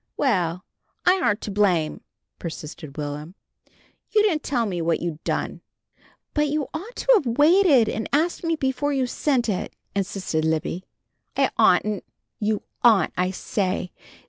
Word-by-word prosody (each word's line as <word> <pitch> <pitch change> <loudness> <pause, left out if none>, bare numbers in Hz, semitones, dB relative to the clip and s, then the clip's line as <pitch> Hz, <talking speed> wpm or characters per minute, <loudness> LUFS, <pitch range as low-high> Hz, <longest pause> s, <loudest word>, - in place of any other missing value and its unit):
"Well, 180 - +1 0.4
I 375 +1 +4
aren't 210 -7 +1
to 210 - -4
blame," 185 -6 +1 0.4
persisted 155 -3 -7
Will'm, 150 +4 -5 0.7
"you 425 -1 +4
didn't 340 -8 +2
tell 245 -5 0
me 180 -5 -2
what 165 0 +1
you'd 165 -2 -4
done." - - -2 0.7
"But 300 0 +2
you 290 -1 -1
ought 390 +10 -6
to - - +2
have 260 - +2
waited 300 - +6
and 220 - -3
asked 320 +6 +1
me 330 -1 +1
before 285 0 -1
you 265 -2 +1
sent 250 0 0
it," 200 -4 -2 0.2
insisted 190 -5 -1
Libby. 160 +3 -1 0.5
"I - - +3
oughtn't!" 210 -2 +3 0.4
"You 215 -1 0 0.2
ought, 225 -5 +5
I 180 +1 +1
say!" 185 -1 -2
215 Hz, 145 wpm, -24 LUFS, 175-290 Hz, 0.7 s, waited